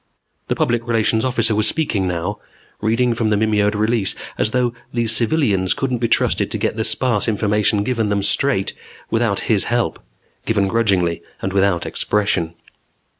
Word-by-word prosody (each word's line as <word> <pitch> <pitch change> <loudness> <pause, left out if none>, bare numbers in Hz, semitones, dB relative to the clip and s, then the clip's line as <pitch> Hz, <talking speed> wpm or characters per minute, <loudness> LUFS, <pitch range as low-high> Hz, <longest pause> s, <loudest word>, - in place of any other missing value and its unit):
The - - 0
Public 115 0 0
Relations 110 -1 +1
Officer 115 -4 +1
was 105 +1 +2
speaking 110 -10 0
now, 85 -2 -3 0.4
reading 115 +3 +1
from 115 -1 -1
the 105 - +2
mimeoed 105 -1 +1
release 110 -2 +1 0.2
as - - +1
though 120 0 0 0.2
these 115 -2 +1
civilians 110 - +2
couldn't 130 -3 -2
be 120 - +1
trusted - - +1
to - - -2
get - - -1
the 110 - -1
sparse 110 -1 0
information 105 -1 +1
given 115 -2 -1
them 100 -1 0
straight 100 -1 +1 0.4
without 115 -3 +1
his 105 -4 +1
help, 120 -8 -1 0.4
given 100 -3 +1
grudgingly 95 -6 +1 0.2
and 95 - -3
without 95 -3 +1
expression. 95 -6 -1
110 Hz, 160 wpm, -19 LUFS, 100-115 Hz, 0.4 s, was